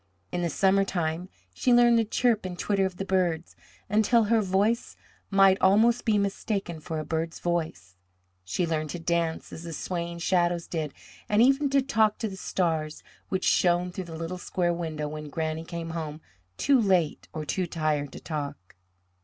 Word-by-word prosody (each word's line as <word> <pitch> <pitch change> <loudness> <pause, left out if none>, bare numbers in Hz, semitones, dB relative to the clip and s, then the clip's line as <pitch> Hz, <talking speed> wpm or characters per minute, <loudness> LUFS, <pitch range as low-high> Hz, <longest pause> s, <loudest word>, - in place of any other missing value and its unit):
In 175 - -2
the 170 - 0
summer 195 +4 +3
time 175 -1 -2 0.2
she 250 - +1
learned 240 -1 +6
the - - +3
chirp 225 0 +1
and 180 -1 -5
twitter 195 0 +1
of 185 -1 -10
the 195 - -3
birds, 175 -4 0 0.3
until 220 +3 +3
her 225 +1 +3
voice 205 +4 0 0.3
might 195 -1 +5
almost 220 +5 +4
be 220 -3 +3
mistaken 200 -3 -2
for 160 +1 -5
a 155 - -3
bird's 160 +1 -2
voice; 155 - -3 0.5
she 95 - -1
learned 155 -2 -2
to 175 - -4
dance 165 -1 -1
as - - -7
the 170 -1 -7
swaying 170 0 -4
shadows 175 -1 +1
did, 155 -4 -4 0.3
and 210 +2 +5
even 275 +2 +3
to 275 -1 +3
talk 220 -5 +2
to 225 - -2
the 195 - -7
stars 160 -5 -2 0.3
which 190 -1 -1
shone 175 0 +3
through 185 +1 -5
the 165 -1 -8
little 165 +3 -5
square 175 -1 0
window 160 -3 -3
when 150 0 -6
Granny 160 +1 -3
came 165 0 -6
home 155 -2 -5 0.4
too 275 -3 +4
late 185 -7 +1
or 155 -1 -5
too 185 +3 -1
tired 155 -4 -1
to - - -8
talk. 145 - -6
175 Hz, 180 wpm, -27 LUFS, 160-200 Hz, 0.5 s, learned